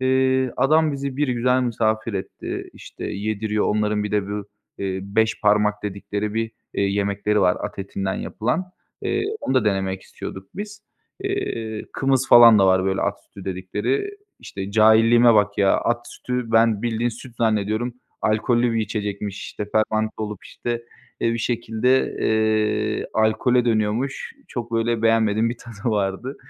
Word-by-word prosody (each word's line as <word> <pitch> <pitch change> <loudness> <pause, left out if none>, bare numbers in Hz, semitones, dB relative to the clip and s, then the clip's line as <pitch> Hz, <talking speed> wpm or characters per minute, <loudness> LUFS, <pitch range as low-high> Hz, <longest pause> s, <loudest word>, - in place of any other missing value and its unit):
Eee, 130 -1 +2
adam 155 +2 +3
bizi 140 -1 -4
bir 145 0 +1
güzel 125 +1 +2
misafir 110 -2 0
etti, 95 - -5
işte, - - -10
yediriyor. 105 +1 -1
Onların 105 0 0
bir 105 - -3
de 100 -1 0
bu, 105 -1 -3 0.3
eee, 95 -1 -2
beş 110 +3 0
parmak 105 0 +3
dedikleri 100 +1 -3
bir, 115 0 -1 0.2
eee, - - 0
yemekleri 100 +1 0
var 90 -1 +3
at - - -6
etinden 95 0 -3
yapılan. 125 +11 -2 0.4
Eee, - - 0 0.2
onu - - -1
da 130 -4 +3
denemek 95 -2 -1
istiyorduk 95 0 -9
biz. 210 +1 -7 0.4
Eee, 115 - -3
kımız 135 -1 +1
falan 115 -3 +9
da 95 - +5
var 95 0 +3
böyle 95 0 0
at - - 0
sütü 100 - -13
dedikleri. 105 - -2 0.2
İşte, 95 0 -6
cahilliğime 115 +2 +6
bak 105 -1 +2
ya, 100 -1 +4
at 120 0 -1
sütü 125 -2 -4
ben 115 -2 +4
bildiğin 120 0 0
süt 120 +1 -11
zannediyorum, 110 +2 0 0.3
alkollü 120 +2 +2
bir 115 - +1
içecekmiş, 105 -1 -3
işte, 105 - -5
fermente 110 0 +1
olup, 105 -2 -5
işte, 120 -1 -4 0.4
eee, 115 - +2
bir 115 - -2
şekilde, 120 +2 0
eee, 110 0 +1
alkole 110 +3 +2
dönüyormuş. 115 +4 -1 0.2
Çok 120 -2 -5
böyle 115 0 0
beğenmediğim 115 0 +3
bir 120 - -6
tadı 115 -2 -12
vardı. 105 +5 -2
110 Hz, 155 wpm, -22 LUFS, 105-120 Hz, 0.4 s, falan